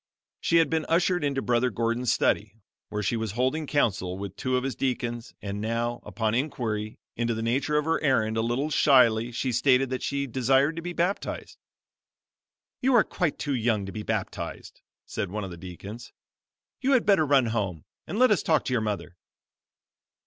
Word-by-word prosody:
She 170 - +2
had 165 - +5
been 160 -1 -1
ushered 175 0 +2
into 140 -2 0
Brother 125 +1 +2
Gordon's 115 0 0
study, 105 0 +1 0.3
where 105 0 -3
he 110 - 0
was 110 -3 -3
holding 130 +6 0
counsel 95 -11 0
with 100 -1 -6
two 130 -1 0
of 125 - -1
his 135 -1 -2
deacons, 120 -3 -3
and 100 0 -4
now, 115 +2 -2
upon 110 -2 -2
inquiry 115 -5 -2 0.2
into 120 0 0
the 110 - -3
nature 135 +6 +1
of 150 - +1
her 165 0 +1
errand 115 -7 +2
a 110 - +1
little 125 +7 -1
shyly 120 -6 +4
she 125 +2 -2
stated 130 +2 +3
that 130 - -2
she 140 0 -1
desired 135 +4 +2
to - - -3
be 175 +1 -5
baptized. 175 +4 -2 1.2
"You 260 0 +3
are 230 - +7
quite 175 -6 -2
too 145 - -2
young 115 -5 +1
to 95 - -6
be 105 - -5
baptized," - - -4 0.2
said 100 - -3
one 105 +2 -4
of 95 - -6
the - - -7
deacons, 95 +6 -9 0.7
"you 275 +1 +2
had 255 - +3
better 195 -6 +5
run 140 -3 +4
home, 100 -8 -2 0.2
and 205 - -4
let 255 0 +5
us 210 - +3
talk 155 -2 +2
to 125 - -1
your 120 - +2
mother." 90 -5 -4
125 Hz, 190 wpm, -27 LUFS, 110-145 Hz, 1.2 s, are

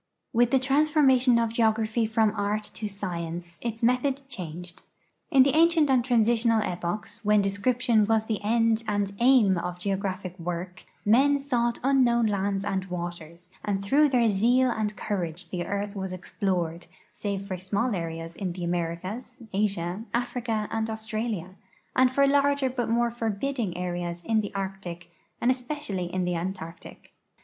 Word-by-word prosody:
With 240 0 +4
the 270 - +4
transformation 270 -2 +4
of 230 -1 0
geography 220 0 +1
from 220 -1 +2
art 210 +1 -2
to 215 - -4
science 175 -4 -5
its 230 -1 -4
method 260 +3 +2
changed. 180 - -7 0.5
In 270 -4 +6
the 275 - +2
ancient 325 -3 +4
and 255 -2 +4
transitional 230 -2 +3
epochs, 190 +5 -4
when 210 0 +4
description 220 +2 +2
was 220 0 +2
the 215 -3 -3
end 225 +1 +2
and 205 -1 0
aim 235 -7 +5
of 180 +1 -4
geographic 190 -1 -3
work, 175 +1 -5 0.2
men 270 +7 +5
sought 240 -4 0
unknown 250 -3 +3
lands 200 -1 0
and 190 -1 -1
waters, 175 -1 -7
and 195 -1 -2
through 290 +7 +4
their 240 -4 +3
zeal 245 +6 +3
and 210 -2 -2
courage 175 -3 -3
the 175 -2 -3
earth 200 +1 -3
was 190 -1 -4
explored 180 -2 -2 0.2
save 200 -1 -4
for 190 - -3
small 200 +6 -1
areas 165 -2 -4
in 185 -2 -3
the 180 0 -6
Americas, 175 +6 -3 0.2
Asia, 195 -2 -1
Africa, 235 -3 -1
and 225 0 -1
Australia, 220 -4 -4 0.4
and 255 0 +5
for 275 +2 +3
larger 280 -1 +2
but 245 -2 -2
more 235 +1 +2
forbidding 230 -2 -2
areas 175 -1 -3
in 220 -1 +2
the 205 - -5
Arctic 190 -3 -5 0.3
and 245 - +3
especially 250 - -3
in 185 0 -1
the 180 - 0
Antarctic. 170 -1 -6
210 Hz, 155 wpm, -27 LUFS, 185-240 Hz, 0.5 s, In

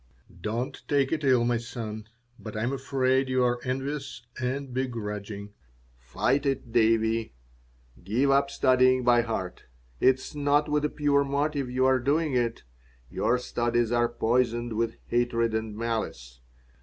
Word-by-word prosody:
"Don't 120 +7 -3
take 140 -2 +2
it 155 -2 -1
ill, 130 -3 +4
my 120 0 +2
son, 110 -2 -6 0.3
but 110 +1 -7
I 110 - -1
am 125 +3 0
afraid 130 0 +1
you 130 -1 +2
are 120 0 +1
envious 135 -1 -4 0.2
and 130 +1 -3
begrudging. 105 -5 -4 0.5
Fight 65 - 0
it, 135 -3 -2
Davie. 115 - +2 0.7
Give 120 +9 +1
up 140 0 +3
studying 130 -1 +3
by 120 -1 +5
heart. 100 -6 -4 0.3
It 130 - +5
is 130 +3 -10
not 145 +1 +2
with 150 0 0
a - - +1
pure 145 -2 +2
motive 140 -1 -1
you 130 +1 +1
are 130 -1 +4
doing 145 +3 +1
it. 120 -2 0 0.5
Your 125 - +1
studies 120 -1 0
are 120 0 +2
poisoned 120 0 0
with 115 +1 -1
hatred 120 -1 0
and 110 -1 -3
malice. 110 - -4
120 Hz, 150 wpm, -27 LUFS, 115-135 Hz, 0.7 s, by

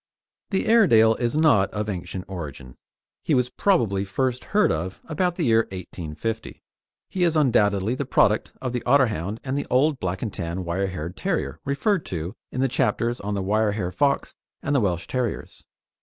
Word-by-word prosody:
The 195 - 0
Airedale 120 - +6
is 120 +4 -1
not 130 - +4
of 105 0 -3
ancient 90 -1 -5
origin. 75 -9 -7 0.5
He 155 - +1
was 125 -1 +1
probably 110 - +2
first 125 +5 -2
heard 210 0 +3
of 90 +4 -3
about 175 +2 0
the 170 - -1
year 115 -1 +4
1850. 90 +3 -6 0.4
He 185 - -1
is 170 -2 +2
undoubtedly 105 -6 +3
the 130 - -2
product 110 -5 +2
of 125 -2 -3
the 125 - -1
Otterhound 110 - +2
and 135 0 -2
the 145 - -2
old 135 +2 +2
Black 95 +1 -3
and 110 - -3
Tan 85 +1 -4
wire 95 +3 -1
haired 90 -1 -5
terrier 190 -3 -2
referred 165 +7 +1
to 85 +4 -4 0.2
in 130 - -2
the 135 - +3
chapters 120 -1 0
on 100 +1 -3
the 100 - -2
wire 105 +2 +1
hair 95 -4 -2
Fox 140 +6 +1 0.3
and 140 - 0
the 135 - +4
Welsh 90 -3 0
Terriers. 125 -4 -4
110 Hz, 180 wpm, -24 LUFS, 95-140 Hz, 0.5 s, Airedale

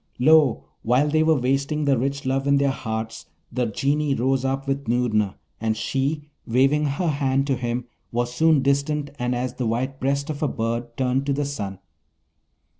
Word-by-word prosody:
Lo! 145 -2 +5 0.2
while 125 +6 +3
they 155 +1 +2
were 155 -2 +3
wasting 140 +4 0
the 140 -1 +4
rich 135 +3 -2
love 135 +1 0
in 140 0 +4
their 140 -1 +2
hearts, 110 -3 -5 0.2
the 125 -2 0
Genii 140 +6 0
rose 130 +2 +1
up 135 +1 -1
with 140 -1 -2
Noorna, 110 -4 +1 0.2
and 110 0 0
she, 140 +5 -1 0.2
waving 135 +5 +3
her 150 +6 -1
hand 135 -2 +1
to 140 -2 +1
him, 120 0 -2 0.3
was 120 +1 -1
soon 155 0 +4
distant 140 +1 0
and 125 0 0
as 125 0 -2
the 125 -2 -2
white 130 +4 -2
breast 140 +3 0
of 145 - -6
a 150 - +2
bird 115 0 -3
turned 130 +1 0
to 140 - +2
the 145 +1 -1
sun. 100 -9 -4
135 Hz, 185 wpm, -23 LUFS, 120-140 Hz, 0.3 s, Lo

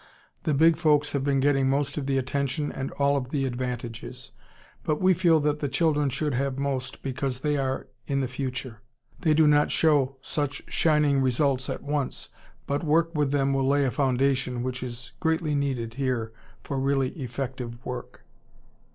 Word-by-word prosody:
The 155 -4 +2
big 160 +2 +5
folks 150 -3 +3
have 140 -2 -1
been 140 -1 +2
getting 135 -1 +3
most 140 +1 0
of 140 -3 -3
the 135 -1 +1
attention 140 +2 -1
and 135 0 -4
all 140 0 +2
of 125 -2 -3
the 140 -1 0
advantages, 125 -1 -5 0.5
but 150 -1 0
we 185 0 +5
feel 170 -3 +4
that 150 0 0
the 145 - -1
children 150 0 +2
should 145 +2 -1
have 135 +1 -1
most 135 -1 -3
because 130 -1 -3
they 150 0 +1
are 135 -1 -1 0.2
in 140 -1 0
the 130 - 0
future. 125 -3 -5 0.4
They 155 -3 +3
do 160 0 +5
not 150 0 +4
show 145 -4 +3
such 145 +1 -3
shining 150 -3 +3
results 130 0 +1
at - - -4
once, 145 -2 -2 0.4
but 140 +2 -1
work 165 +2 +2
with 150 -3 +1
them 140 -1 +1
will 135 -1 +1
lay 140 0 +3
a 130 - +1
foundation 130 -1 +1
which 125 0 -3
is 120 -1 -6
greatly 160 -2 0
needed 130 -5 -1
here 125 -4 -2 0.3
for 135 - -3
really 135 -1 +1
effective 125 -3 -6
work.... 125 -1 -7
135 Hz, 175 wpm, -26 LUFS, 130-145 Hz, 0.5 s, big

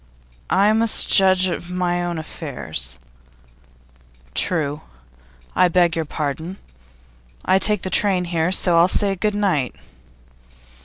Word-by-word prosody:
'I 205 +2 +3
must 225 0 +3
judge 190 -1 +4
of 175 0 -5
my 175 -1 -1
own 175 -1 -3
affairs.' 80 - -5 1.4
'True; 150 - -1 0.7
I 185 - +4
beg 175 -1 +2
your 165 -1 -2
pardon. 160 +5 -4 0.9
I 190 - +3
take 210 -1 +2
the 185 - -3
train 190 -3 +2
here, 170 0 -1
so 175 -2 +2
I'll 170 - +5
say 195 +1 0
good 210 +2 -1
night. 170 - 0
175 Hz, 120 wpm, -20 LUFS, 160-190 Hz, 1.4 s, I'll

